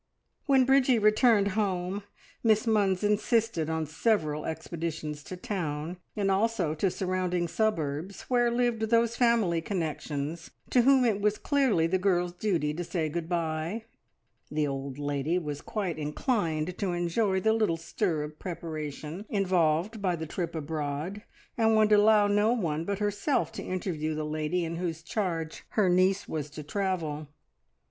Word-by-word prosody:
When 265 -2 +5
Bridgie 265 -2 +4
returned 215 -1 +4
home, 190 -1 -1 0.4
Miss 220 -1 +3
Munns 205 -4 +2
insisted 210 -5 +1
on 160 -1 -1
several 155 -2 0
expeditions 160 -2 -4
to 185 - -7
town, 170 -3 -3 0.2
and 200 -2 +1
also 195 -5 +1
to 175 +5 +1
surrounding 180 -1 -1
suburbs, 170 -3 -1
where 240 -1 +2
lived 240 -1 +1
those 230 0 +3
family 230 -9 +3
connections 160 -3 -3 0.2
to 250 - +5
whom 265 0 +5
it 210 -3 +1
was 210 0 +2
clearly 265 - +2
the 185 +3 +1
girl's 180 -2 +1
duty 175 -6 0
to 175 +3 -3
say 165 -2 -2
good 165 +1 -4
bye. 170 +5 -2 0.6
The 150 0 0
old 135 -1 -4
lady 145 +3 -1
was 150 -4 -4
quite 185 -7 -3
inclined 160 - -1
to 190 -4 0
enjoy 190 +3 +1
the 220 +3 +3
little 215 -7 +1
stir 165 -1 -1
of 150 0 -8
preparation 160 +1 -6
involved 185 +1 +1
by 185 -3 +1
the 160 -1 -5
trip 170 +1 -4
abroad, 155 +5 -3 0.4
and 220 -1 +4
would 215 0 +4
allow 210 0 +6
no 205 +3 +3
one 165 -8 -1
but 200 +1 -1
herself 205 - 0
to - - -6
interview 165 -4 -2
the 155 0 -2
lady 155 +3 -1
in 165 0 -4
whose 165 -2 -3
charge 165 -6 -3
her 200 -4 +4
niece 185 +2 +3
was 150 -2 -3
to 150 +1 -8
travel. 160 -4 -2
180 Hz, 155 wpm, -28 LUFS, 155-210 Hz, 0.6 s, allow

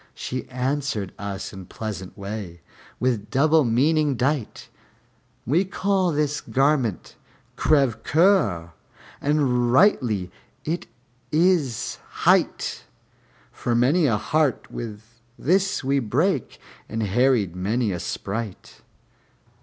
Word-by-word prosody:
She 130 0 -5
answered 130 -5 -2
us 100 0 -5
in 95 -2 -9
pleasant 100 -4 -6
way, 100 -4 -6 0.4
with 120 -5 0
double 155 +3 +4
meaning 145 +5 +2
dight, 130 -1 -2 0.8
"We 155 - +3
call 190 -1 0
this 150 -1 0
garment 135 - 0 0.4
crève 135 -7 +2
coeur; 130 - +2 0.5
and 130 -5 +2
rightly 120 - +3 0.3
is 165 +3 -3 0.4
it 155 - +1
hight, - - +1 0.7
For 120 - -2
many 145 +7 +3
a 115 -5 +2
heart 150 +4 0
wi' 115 -3 -5 0.4
this 190 +3 +1
we 140 +1 +2
brake 135 - 0 0.3
and 110 0 -2
harried 110 -3 +2
many 105 +4 0
a 90 - -3
sprite." 105 +3 -5
130 Hz, 105 wpm, -24 LUFS, 105-150 Hz, 0.8 s, double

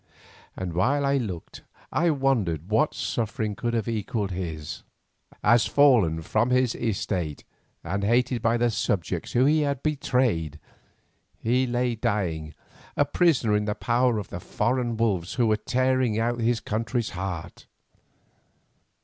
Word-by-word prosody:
And 90 -2 -4
while 135 - +1
I 140 0 +2
looked 95 -10 -5 0.3
I 170 +1 +2
wondered 115 - 0
what 145 +8 +2
suffering 110 -2 -2
could 120 +3 -2
have 115 -3 -1
equalled 110 -2 -2
his, 80 -4 -5 0.6
as 115 +3 +4
fallen 110 - +4
from 110 +8 +1
his 125 -2 +2
estate 95 -8 -2 0.4
and 100 +4 -2
hated 120 +2 +2
by 115 0 +2
the 120 0 +2
subjects 95 -3 -2
whom 125 +2 +4
he 155 +2 +4
had 140 -2 -1
betrayed, 125 - 0 0.8
he 125 +3 +1
lay 125 0 0
dying, 85 -9 -2 0.4
a 145 - +4
prisoner 145 -8 +2
in 105 0 0
the 105 0 -1
power 120 0 +1
of 100 -4 -5
the 85 - -6
foreign 120 +5 -1
wolves 100 -7 0
who 120 - +2
were 110 -1 +3
tearing 130 +1 +1
out 120 +1 0
his 115 0 +1
country's 115 +2 -2
heart. 90 -3 -6
115 Hz, 140 wpm, -26 LUFS, 95-125 Hz, 0.8 s, as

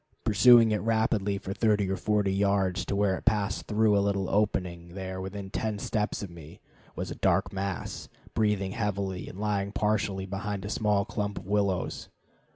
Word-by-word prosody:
Pursuing 115 +1 +6
it 105 - 0
rapidly 110 -2 +1
for 95 0 -5
thirty 105 -2 +2
or 95 - 0
forty 105 -1 +1
yards 100 -2 +1
to - - -2
where 100 -1 +2
it - - -18
passed 105 -1 0
through 105 0 +3
a 100 - +4
little 100 -1 0
opening, 90 -4 -1
there, 95 -1 -5
within 95 0 -6
ten 110 -1 -2
steps 105 0 -2
of 95 - -7
me, 80 -3 -12 0.4
was - - -4
a - - -5
dark - - +1
mass, 95 -1 -4 0.2
breathing 105 -3 +1
heavily 100 -4 -2
and 95 - -10
lying 100 -1 -1
partially 105 -2 0
behind 100 +1 -4
a - - -4
small 105 -3 +1
clump 105 -1 -3
of 90 - -7
willows. 100 -2 -1
100 Hz, 175 wpm, -28 LUFS, 95-105 Hz, 0.4 s, Pursuing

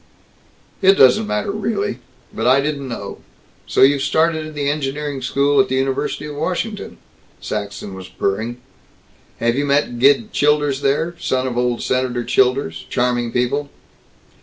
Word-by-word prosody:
"It 195 0 +6
doesn't 130 - +5
matter, 105 - -1
really. 205 - -2 0.3
But 115 - -1
I 130 +2 +5
didn't 140 -1 -2
know 105 -5 -6 0.5
So - - +3
you've 140 +1 +5
started 160 +2 +1
in 155 - -10
the 145 -1 -2
engineering 145 -1 -2
school 140 +2 +2
at 130 - -2
the 130 - 0
University 135 +2 -1
of 150 -1 -7
Washington," 185 +7 -3 0.4
Saxton 100 -1 -5
was 95 0 -9
purring. 110 +6 -2 0.8
"Have 120 +1 +1
you 145 +2 0
met 140 -4 +1
Gid 145 - +3
Childers 145 -2 +2
there 150 +5 +1
son 130 -5 0
of 125 -2 -3
old 125 -1 0
Senator 125 -1 0
Childers 125 -11 +1
charming 120 -1 0
people." 135 +4 -1
135 Hz, 150 wpm, -19 LUFS, 120-150 Hz, 0.8 s, It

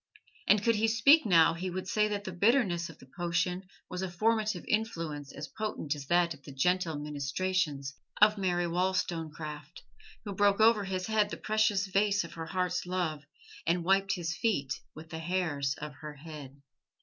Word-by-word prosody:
And 205 0 +5
could 230 -1 +3
he 220 +1 +2
speak 230 +6 +5
now 165 -3 +6
he 180 +3 -4
would 185 +1 -5
say 210 +2 +2
that 205 -1 -3
the 190 - -5
bitterness 185 -3 +2
of 165 - -12
the - - -15
potion 175 +5 -2 0.2
was 180 - -5
a 190 - -2
formative 215 +1 0
influence 165 -10 -2
as 150 +3 -7
potent 210 -9 -3
as 145 -2 -8
that 175 0 +3
of 145 - -16
the - - -10
gentle 170 +3 +1
ministrations 145 0 -2 0.3
of 210 0 +6
Mary 180 -3 0
Wollstonecraft, 165 -4 -3 0.4
who 200 - -4
broke 200 +1 +3
over 220 -2 +5
his 185 -1 -2
head 215 -2 +2
the - - -5
precious 215 -2 +1
vase 200 +1 +2
of 170 - -10
her 165 -1 -6
heart's 180 0 -1
love 160 -5 -2 0.4
and 170 +1 +2
wiped 195 +2 +3
his 165 -2 -3
feet 145 - 0 0.2
with 155 0 -11
the 160 - -5
hairs 160 -6 -1
of 150 0 -6
her 150 +1 -9
head. 145 -2 -10
180 Hz, 180 wpm, -30 LUFS, 155-200 Hz, 0.4 s, now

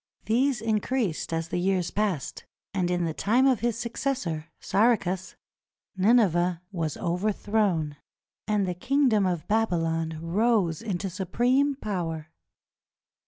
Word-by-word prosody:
These 245 +1 +2
increased 220 -5 -1
as 165 0 -2
the 175 - -1
years 185 -1 0
passed, 200 -9 -2 0.3
and 185 -3 0
in 175 -1 0
the 160 - -2
time 235 +10 +2
of 260 -5 +4
his 235 0 0
suc 235 0 -5
cessor, 175 - -2
Saracus, 190 -4 +1 0.6
Nineveh 185 -4 +3
was 165 -6 -2
overthrown, 185 -3 0 0.5
and 210 -2 +1
the 180 - -1
kingdom 245 -1 +2
of 175 -3 -2
Babylon 165 -7 0
rose 185 0 +1
into 200 -4 -3
supreme 245 +10 +1
power. 165 - -4
195 Hz, 120 wpm, -27 LUFS, 170-225 Hz, 0.6 s, of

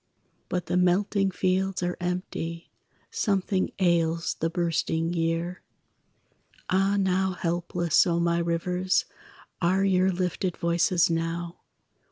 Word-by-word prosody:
But 180 -1 -2
the 180 - 0
melting 195 +2 +2
fields 185 0 0
are 175 0 -1
empty, 175 -2 -4 0.4
Something 195 -2 0
ails 170 -3 +1
the 165 - 0
bursting 165 -1 -1
year. 165 +1 -1 1.1
Ah, 195 +2 +2
now 190 -1 +1
helpless, 175 0 +1
O 170 -1 +1
my 170 0 +1
rivers, 180 +2 0 0.6
Are 185 +3 +2
your 190 -1 +3
lifted 180 0 -2
voices 170 +1 +2
now! 165 +1 -3
175 Hz, 110 wpm, -26 LUFS, 170-185 Hz, 1.1 s, your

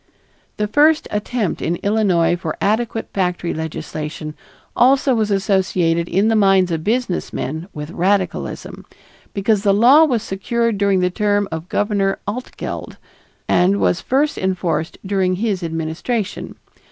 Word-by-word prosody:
This 210 - 0
first 305 +4 +4
attempt 210 -1 -2
in 170 - 0
Illinois 190 -5 +2
for 165 -3 -5
adequate 225 +2 -1
factory 180 -2 -1
legislation 155 -1 -5 0.4
also 265 +2 +4
was 220 -3 +1
associated 185 -4 +1
in 195 +4 +2
the 225 - +3
minds 195 -3 +4
of 160 -1 -2
businessmen 180 - -2
with 150 +1 -7
radicalism, 185 +2 -1 0.5
because 200 +1 +1
the 200 -1 +3
law 255 +9 +7
was 240 -7 0
secured 230 +2 -1
during 200 -2 +2
the 180 0 +1
term 205 0 +1
of 160 +2 -6
Governor 200 -2 0
Altgeld 245 +5 -6 0.5
and 190 +3 +3
was 175 - +1
first 285 +4 0
enforced 180 -4 -1
during 190 -2 +1
his 200 -1 -1
administration. 165 +7 -3
195 Hz, 130 wpm, -19 LUFS, 175-220 Hz, 0.5 s, law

